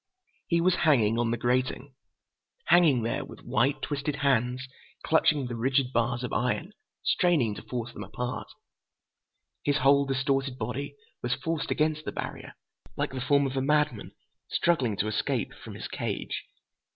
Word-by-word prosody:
He 170 -1 +2
was 185 +1 +3
hanging 115 -8 +4
on 120 -1 +1
the 120 - 0
grating. 125 +3 0 0.7
Hanging 155 -9 +5
there, 115 - -1
with - - -12
white, 130 +6 +1
twisted 145 0 -2
hands 130 -2 +1 0.4
clutching 155 -3 +3
the 120 -1 -4
rigid 130 +2 +1
bars 120 +1 +1
of 125 - -4
iron, 165 +10 -1 0.3
straining 160 - +2
to - - -8
force 120 -1 -5
them - - -6
apart. 125 0 -4 1.2
His 145 0 +2
whole 140 +2 +5
distorted 135 -1 0
body 140 +3 -4 0.3
was 120 +1 0
forced 160 +2 -3
against 155 0 +1
the - - -2
barrier, - - -6 0.4
like - - -1
the 130 -1 -4
form 140 +2 +3
of 135 0 -3
a 135 - +1
madman 150 -4 +1 0.4
struggling 130 -12 +1
to 105 - 0
escape 110 - -1
from - - -10
his - - -6
cage. - - -4
135 Hz, 155 wpm, -28 LUFS, 120-145 Hz, 1.2 s, Hanging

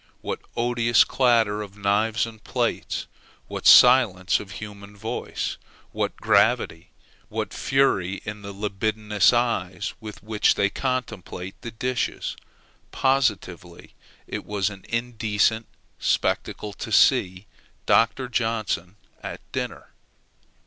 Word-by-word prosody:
what - - -4 0.2
odious 120 0 +3
clatter 115 -5 +2
of 100 -1 -9
knives 105 +3 +1
and 110 -3 -11
plates! - - -2 0.4
what - - -2
silence 115 -8 +6
of 105 - -8
the 105 - -10
human 100 -1 -9
voice! 110 +3 -4 0.3
what - - -2
gravity! 80 +2 +2 0.4
what - - -4
fury 100 -9 +1
in 105 0 -6
the 100 0 -7
libidinous 105 0 +1
eyes 115 -7 -1
with 105 -2 -10
which 105 0 +2
they 100 0 +1
contemplate 105 -8 -4
the 115 - -6
dishes! 125 +2 -2 0.5
Positively 100 -10 -1 0.3
it - - -5
was 105 -1 -1
an 95 -1 -12
indecent 115 -1 0 0.3
spectacle 105 -1 -1
to - - -7
see 90 +2 +3 0.4
Dr. 115 +3 +3
Johnson 110 -6 -2 0.3
at - - -6
dinner. - - -5
105 Hz, 115 wpm, -24 LUFS, 100-115 Hz, 0.5 s, silence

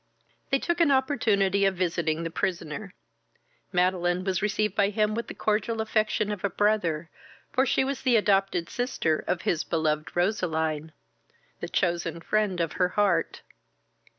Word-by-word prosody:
They 275 - +3
took 345 +4 -1
an 330 - +5
opportunity 215 -8 +2
of 195 -1 +2
visiting 170 -3 -1
the 165 - -4
prisoner. 180 +3 -3 0.8
Madeline 180 0 +1
was 190 -2 -1
received 210 -1 0
by 200 -1 +2
him 210 +1 +1
with 235 +1 -3
the - - -8
cordial 220 +1 0
affection 215 -1 0
of 205 -2 -5
a 200 - +1
brother, 175 -6 0 0.4
for 265 +1 +2
she - - +2
was 275 0 -3
the 255 -3 +3
adopted 195 -5 +2
sister 170 -11 -1
of 180 -1 -1
his 160 - 0
beloved 155 -2 -1
Roseline, 160 -5 0 0.7
the - - -5
chosen 170 -1 -1
friend 205 0 0
of 165 -2 0
her 180 - +1
heart. 190 -4 0
195 Hz, 150 wpm, -27 LUFS, 170-215 Hz, 0.8 s, an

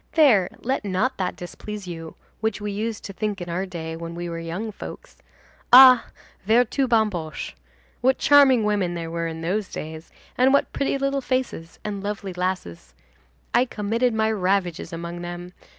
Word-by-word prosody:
There, 245 - +5
let 260 0 -1
not 205 +7 0
that 185 -2 -2
displease 205 +3 -8
you 165 -2 -7 0.2
which 220 -1 -1
we 210 0 -3
used 215 +2 -3
to 195 - -7
think 205 0 -3
in 175 -1 -6
our 185 +3 -2
day, 160 -3 -6
when 165 0 -7
we 175 0 -4
were 165 0 -4
young 175 +7 -4
folks. - - -10 0.6
Ah! 255 -1 +9 0.4
vertu 245 +5 +2
bamboche! 210 -10 0 0.5
what 260 +1 +3
charming 275 -5 +6
women 200 -4 0
there 165 -1 -5
were 165 0 -2
in 160 0 -6
those 190 +5 -1
days, 160 +1 -7 0.3
and 260 +2 +5
what 280 - +2
pretty 275 0 0
little 275 0 0
faces 255 -11 -3
and 210 -1 -3
what 195 - -8
lovely 200 -2 -4
lasses! 90 - -4 0.6
I 245 - +4
committed 230 +1 0
my 220 0 +2
ravages 185 -4 0
among 170 +1 -6
them. 175 +1 -7
200 Hz, 170 wpm, -24 LUFS, 175-230 Hz, 0.6 s, Ah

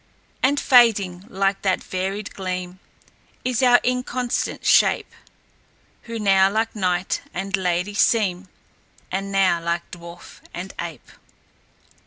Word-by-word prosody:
"And 280 +2 +2
fading, 200 -8 +4
like 195 -1 0
that 190 -2 0
varied 195 +2 -4
gleam, 185 -1 -5 0.7
Is 250 -1 0
our 245 -1 +6
inconstant 250 -1 -2
shape, - - +3 0.9
Who 230 -1 -5
now 195 -2 +4
like 220 +3 -1
knight 185 -2 -1
and 195 +2 -1
lady 180 +1 -1
seem, 200 -3 +1 0.6
And 195 +1 -3
now 190 -3 +2
like 170 0 -3
dwarf 170 0 -11 0.2
and 185 +2 -6
ape." 165 -6 -8
195 Hz, 115 wpm, -22 LUFS, 180-220 Hz, 0.9 s, our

